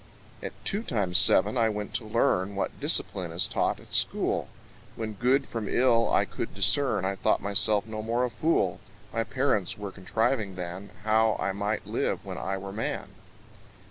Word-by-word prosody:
At - - -5
two 205 +1 +1
times 100 - +1
seven 105 +5 +4
I 115 -1 +4
went 105 -1 -4
to 115 -1 -2
learn 100 -3 +1
What 100 - -3
discipline 90 -3 0
is 85 +2 +3
taught - - 0
at - - -14
school: - - +1 0.5
When 110 -1 -4
good 130 +6 +2
from 110 -3 -4
ill 115 -2 +3
I - - +3
could - - -5
discern, 140 -9 +2
I 95 - 0
thought - - +2
myself 100 +1 +1
no 110 -1 -5
more 115 +3 0
a 125 - -4
fool: 165 +6 +1 0.3
My 115 - +1
parents 130 -8 0
were 100 -1 -6
contriving 105 +2 -1
than, 90 +2 -6
How 110 0 +3
I 100 - 0
might 100 +2 -2
live - - -2
when - - -5
I 95 0 -2
were 95 0 -7
man. 110 - -3
105 Hz, 175 wpm, -28 LUFS, 95-115 Hz, 0.5 s, seven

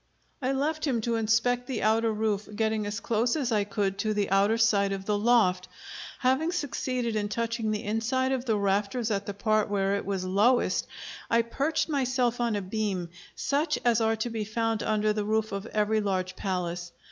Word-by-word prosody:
I 260 0 0
left 305 +3 -1
him 250 -4 +1
to 230 +1 -1
inspect 230 +3 +1
the 255 -5 -3
outer 225 +1 +3
roof, 215 -1 -1
getting 220 -1 0
as 210 +2 -3
close 235 +1 0
as 270 -6 -1
I 210 -2 +2
could 200 -1 -2
to 215 +1 0
the 205 -2 0
outer 200 +3 +3
side 200 -3 +3
of 195 0 -5
the 210 - +1
loft. 205 -5 +3 0.5
Having 275 +7 +1
succeeded 255 -6 -2
in 205 -1 -1
touching 230 0 -2
the 210 -1 -2
inside 245 +5 0
of 260 -1 -1
the 220 -4 +1
rafters 205 +4 0
at 200 -1 -2
the 205 - -4
part 215 0 +1
where 200 -1 +1
it - - -4
was 190 -2 -2
lowest, 210 +7 +2 0.4
I 230 0 +3
perched 280 +7 -1
myself 255 -4 0
on 235 -2 +1
a 205 - -2
beam, 190 -3 -2 0.3
such 290 +4 0
as 235 -1 +3
are 225 0 +2
to 225 +2 -3
be 225 -1 -2
found 225 0 -1
under 215 0 +1
the 210 -1 -1
roof 220 +1 0
of 200 +2 -4
every 215 0 +1
large 185 -2 -1
palace. 175 -2 -3
220 Hz, 195 wpm, -28 LUFS, 205-240 Hz, 0.5 s, outer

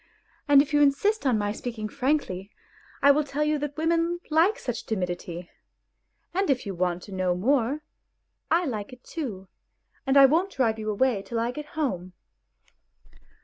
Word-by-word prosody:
And 285 -1 +7
if 295 0 -10
you 295 - +4
insist 290 +6 +2
on 245 -4 +3
my 205 -1 -1
speaking 220 0 -5
frankly, 255 -8 -1 0.5
I 280 - +8
will 300 +2 +2
tell 285 +1 -2
you 300 0 +1
that 290 0 -4
women 335 +2 +1
like 335 +8 +4
such 245 -3 -5
timidity; 175 -3 -4 0.8
and 385 -1 0
if 260 -4 +1
you 200 - -4
want 180 0 -1
to - - -11
know 185 -2 0
more, 260 +7 +1 0.7
I 345 +2 +3
like 220 -5 -4
it 250 - -14
too, 215 - -6 0.6
and 270 +1 +4
I 275 - +10
won't 340 +8 +2
drive 225 -4 +1
you 215 0 -3
away 215 0 +1
till 230 +3 -4
I 235 +1 0
get 300 +3 -7
home." 185 - -2
260 Hz, 170 wpm, -26 LUFS, 205-300 Hz, 0.8 s, I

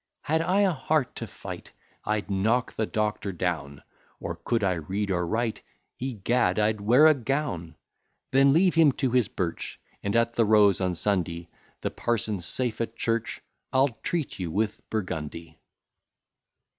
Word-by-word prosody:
Had 160 +2 +1
I 185 +4 +2
a 195 -2 +4
heart 150 -2 0
to - - -5
fight, - - -9 0.3
I'd 105 -1 -1
knock 110 +5 +1
the 110 - -1
Doctor 105 -2 -1
down; 80 -6 -3 0.4
Or - - -4
could 115 -3 -1
I 95 -2 +3
read 95 +5 -3
or 90 -2 0
write, 115 +3 -1 0.4
Egad! 120 -5 0
I'd 105 0 +1
wear 125 +9 +6
a 155 - +8
gown. 120 - -3 0.6
Then 135 +1 +5
leave 175 +5 +4
him 160 -4 +5
to 130 -2 -1
his 125 -4 +3
birch; 85 -3 -4 0.2
And 100 +2 -2
at 115 0 +2
the 115 - +3
Rose 105 -3 +5
on 90 -1 0
Sunday, 85 -3 -1 0.3
The - - -2
parson 110 -4 -1
safe 115 +6 -2
at 115 0 -3
church, 115 -1 -1 0.3
I'll 135 +2 +4
treat 165 -11 -2
you 90 -3 -3
with 105 +5 -1
burgundy. 85 -6 -4
110 Hz, 155 wpm, -27 LUFS, 95-130 Hz, 0.6 s, a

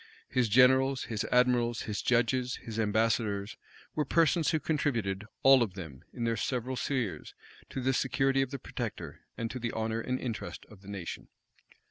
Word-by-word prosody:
His 125 -3 +1
generals, 130 +3 +5
his 110 -3 -3
admirals, 125 -2 +2
his 105 -1 -3
judges, 125 +1 +1
his 115 -1 -7
ambassadors, 110 -1 +1 0.4
were 150 - +1
persons 165 +2 +3
who 160 - +1
contributed, 120 -10 -1 0.2
all 135 -1 +8
of 105 -6 -1
them, 80 -9 -8
in 120 - -5
their 115 0 +1
several 130 0 -2
spheres, 125 -6 -2 0.3
to - - -4
the 130 +1 +1
security 135 +1 +2
of 135 - -1
the 140 - -4
protector, - - -6 0.2
and 115 -1 -3
to 130 - -5
the 120 -1 -2
honor 110 0 -1
and 130 +2 -2
interest 115 -3 -5
of 100 -3 -14
the 100 - -16
nation. 95 -4 -6
120 Hz, 170 wpm, -30 LUFS, 110-130 Hz, 0.4 s, all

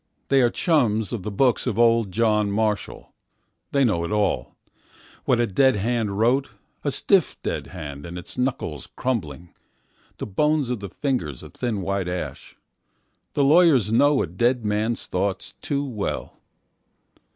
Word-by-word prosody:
They 135 -1 +5
are 120 - +4
chums 115 - +1
of 115 - -3
the 105 - -4
books 125 +5 +1
of 110 -4 -1
old 115 -3 +3
John 105 0 +2
Marshall.They 110 +5 -3
know 105 -9 +1
it 85 - -3
all, 105 -2 0 0.7
what 120 - +2
a 120 - +3
dead 130 +6 +3
hand 105 -1 -1
Wrote,A 120 0 -1
stiff - - +2
dead - - -3
hand 75 -4 -8
and 85 +1 -7
its 90 - -8
knuckles 125 - -2
crumbling, 85 - -3 0.6
The - - -4
bones 150 +5 +1
of 125 - -2
the 100 -1 -7
fingers 85 - -3
a - - -11
thin 110 -6 -3
white 100 -1 -1
ash. 90 0 -6 0.8
The 145 - +2
lawyers 140 - +5
knowa 145 +4 +4
dead 120 +8 0
man's 105 +2 -1
thoughts 95 +1 -2
too 140 0 -1
well. 110 -7 -4
110 Hz, 145 wpm, -24 LUFS, 100-130 Hz, 0.8 s, They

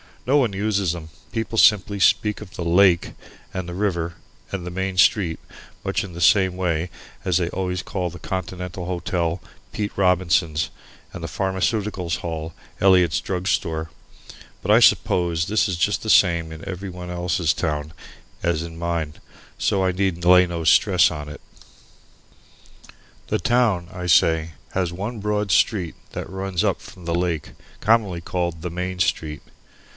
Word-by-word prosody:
Nobody 125 -6 +2
uses 100 -4 +1
them. 80 -2 -8 0.2
People 115 0 -2
simply 100 -1 +4
speak 105 +2 +3
of 100 -3 -11
the 85 - -4
"lake" 90 0 +4 0.4
and 95 -2 -4
the - - -5
"river" 85 -4 -1 0.4
and 95 -3 -4
the 90 - -5
"main 95 +1 -3
street," 90 -2 +3 0.4
much - - -1
in 95 -3 -8
the 85 - -7
same 95 -1 +4
way 85 -2 -1 0.4
as 90 -3 +2
they 85 -2 0
always 90 -1 -3
call 90 -2 -3
the 85 - -10
Continental 90 0 -5
Hotel, 85 -1 -1 0.3
"Pete 105 -1 -3
Robinson's" 85 -4 +2 0.4
and - - -7
the - - -3
Pharmaceutical 95 -1 -1
Hall, 80 -1 -3 0.3
"Eliot's 90 -4 +4
Drug 90 -1 -3
Store." 80 -5 -1 0.7
But - - +1
I - - +7
suppose 85 -2 +3
this 110 +3 +2
is 95 - -1
just 100 +5 +1
the 110 - -4
same 85 -5 +4
in 80 0 -9
every 95 +1 -5
one 90 -1 -8
else's 85 -2 0
town 75 -2 -3 0.5
as 85 -2 0
in 85 -1 -8
mine, 85 -3 -2 0.4
so 95 -1 +1
I 95 - +2
need 90 -2 -1
lay 90 0 +7
no 85 -1 -4
stress 90 +3 +5
on 75 -3 -6
it. 75 - -10 1.9
The - - 0
town, 105 -4 +2
I 90 -1 -6
say, 80 -1 +3 0.2
has 90 -2 -1
one 105 +6 -4
broad 105 -1 -1
street 90 -3 +2 0.2
that - - -5
runs 95 -1 -2
up - - +1
from 90 -2 -13
the 85 0 -1
lake, 85 -4 -1 0.3
commonly 105 -6 +2
called 85 -2 -3
the 90 0 -4
Main 90 +1 -3
Street. 80 -4 -1
90 Hz, 160 wpm, -23 LUFS, 85-95 Hz, 1.9 s, I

